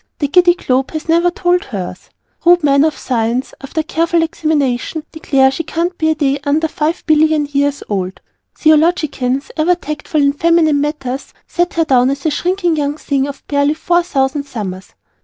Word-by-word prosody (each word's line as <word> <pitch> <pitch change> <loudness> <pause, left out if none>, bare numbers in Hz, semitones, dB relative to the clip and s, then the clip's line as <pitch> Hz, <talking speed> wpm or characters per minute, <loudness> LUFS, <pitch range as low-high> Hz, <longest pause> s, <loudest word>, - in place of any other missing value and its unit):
The 290 - -1
Giddy 350 +3 +4
Globe 265 -5 0
has 315 +1 -5
never 340 +2 +3
told 355 0 +1
us - - -17
hers. 185 -6 -6 0.3
Rude 350 -1 +5
men 280 -1 +4
of 315 -1 0
science, 240 +1 -2
after 295 +3 -3
careful 335 +1 +1
examination, 305 -2 -1
declare 270 -4 +2
she 270 - -3
can't 335 +3 -2
be 315 - +2
a 315 - +2
day 285 -2 0
under 300 +3 +1
five 310 +2 -2
billion 310 -1 +3
years 285 0 -1
old. 190 -2 -3 0.4
Theologians, 305 -4 +1
ever 335 +3 +3
tactful 305 -2 -2
in 280 0 +3
feminine 315 -2 +2
matters, 280 -3 -4
set 350 0 -1
her 330 -1 +2
down 255 -3 +3
as 275 +2 -4
a 315 - +2
shrinking 350 +2 0
young 290 0 -1
thing 280 -3 -1
of 285 - -9
barely 285 +1 +1
four 345 +2 +1
thousand 280 -3 -1
summers. 190 -7 -7
300 Hz, 175 wpm, -16 LUFS, 275-330 Hz, 0.4 s, Rude